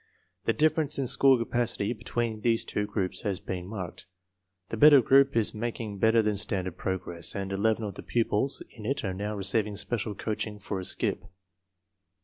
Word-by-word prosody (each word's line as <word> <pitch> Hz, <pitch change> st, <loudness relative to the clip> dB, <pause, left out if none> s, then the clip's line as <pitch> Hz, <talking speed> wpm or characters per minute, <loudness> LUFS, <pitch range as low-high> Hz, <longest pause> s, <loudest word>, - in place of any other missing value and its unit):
The 115 Hz, -, +2 dB
difference 155 Hz, +3 st, +1 dB
in 135 Hz, -, 0 dB
school 135 Hz, +1 st, +5 dB
capacity 115 Hz, -2 st, -1 dB
be 110 Hz, -, -15 dB
tween 115 Hz, -2 st, -2 dB
these 115 Hz, -1 st, +2 dB
two 105 Hz, 0 st, -2 dB
groups 100 Hz, -3 st, -2 dB
has 100 Hz, -4 st, -2 dB
been 90 Hz, -1 st, -5 dB
marked. 95 Hz, -3 st, -7 dB, 0.6 s
The -, -, -3 dB
better 145 Hz, +3 st, +8 dB
group 135 Hz, +3 st, +4 dB
is 110 Hz, -, +2 dB
making 110 Hz, -2 st, -4 dB
better 110 Hz, +2 st, +4 dB
than 105 Hz, -1 st, 0 dB
standard 95 Hz, -4 st, -1 dB
progress, 90 Hz, -3 st, -3 dB
and 100 Hz, -1 st, -3 dB
11 110 Hz, +3 st, +1 dB
of 105 Hz, -2 st, -4 dB
the -, -, -8 dB
pupils 120 Hz, +2 st, 0 dB
in 110 Hz, -2 st, -8 dB
it 140 Hz, +2 st, -1 dB
are 95 Hz, -3 st, -2 dB
now 105 Hz, +3 st, -4 dB
receiving 100 Hz, +1 st, 0 dB
special 105 Hz, 0 st, -3 dB
coaching 105 Hz, 0 st, -4 dB
for 100 Hz, -1 st, -4 dB
a 95 Hz, -, -5 dB
"skip." -, -, -1 dB
105 Hz, 180 wpm, -28 LUFS, 100-120 Hz, 0.6 s, better